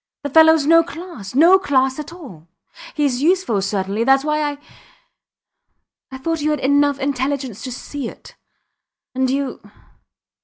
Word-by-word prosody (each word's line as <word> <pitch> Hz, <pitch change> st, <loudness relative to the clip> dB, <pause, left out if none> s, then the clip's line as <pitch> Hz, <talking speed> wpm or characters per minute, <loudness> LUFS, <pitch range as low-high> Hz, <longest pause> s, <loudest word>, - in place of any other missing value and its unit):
The 285 Hz, -, -4 dB
fellows 320 Hz, -1 st, +5 dB
no 330 Hz, +2 st, +6 dB
class 325 Hz, -, -9 dB
no 340 Hz, +7 st, +6 dB
class 265 Hz, -5 st, 0 dB
at 300 Hz, +1 st, -7 dB
all. 245 Hz, -, -13 dB, 0.5 s
Hes 275 Hz, -4 st, 0 dB
useful, 330 Hz, -, +1 dB
certainly, 200 Hz, +2 st, -2 dB
thats 270 Hz, +3 st, +3 dB
why 305 Hz, 0 st, 0 dB
I... -, -, -12 dB, 1.5 s
I 265 Hz, -, -7 dB
thought 325 Hz, +4 st, -3 dB
you 300 Hz, -, 0 dB
had 300 Hz, -2 st, 0 dB
enough 285 Hz, +1 st, +2 dB
intelligence 265 Hz, -4 st, -3 dB
to 255 Hz, -, -5 dB
see 265 Hz, +1 st, -6 dB
it.... -, -, -15 dB, 0.8 s
And 260 Hz, 0 st, 0 dB
you 275 Hz, -1 st, -3 dB
280 Hz, 145 wpm, -19 LUFS, 255-305 Hz, 1.5 s, no